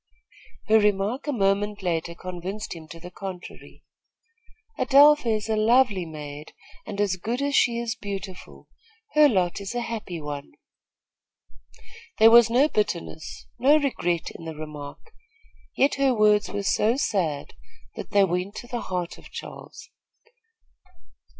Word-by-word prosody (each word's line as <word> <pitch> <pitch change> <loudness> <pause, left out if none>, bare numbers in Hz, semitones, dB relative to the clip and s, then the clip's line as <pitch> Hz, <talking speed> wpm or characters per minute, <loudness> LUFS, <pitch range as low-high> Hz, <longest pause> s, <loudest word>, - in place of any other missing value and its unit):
Her 220 0 +6
remark 210 +6 0
a - - +1
moment 205 -2 0
later 170 -1 -2
convinced 185 +4 -6
him 160 -1 -11
to 165 +2 -11
the 175 +2 -10
contrary. 185 -1 -9 1.0
"Adelpha 290 +1 +6
is 215 -1 -1
a 220 - 0
lovely 215 -4 +3
maid 150 -1 -9 0.3
and 200 - -6
as 200 -3 +1
good 230 +7 -3
as 280 0 0
she 235 -2 +3
is 235 -1 -2
beautiful. 195 -3 -8 0.5
Her 300 -1 +6
lot 185 -4 0
is 200 +4 -6
a 240 - -1
happy 215 -7 -5
one." 145 -2 -7 1.6
There 225 +1 +7
was 235 -1 +7
no 255 +5 +4
bitterness, 170 - -3
no 280 +5 +5
regret 175 - -1
in 165 - -11
the 160 -1 -6
remark; 150 - -9 0.7
yet 275 - +3
her 265 -2 +3
words 210 -1 +3
were 205 0 -4
so 220 +5 +2
sad, 165 - -1 0.4
that - - -7
they 200 -1 +4
went 185 +2 -2
to 240 - -8
the 240 -1 -4
heart 180 -2 -4
of - - -15
Charles. - - -10
205 Hz, 145 wpm, -25 LUFS, 175-235 Hz, 1.6 s, There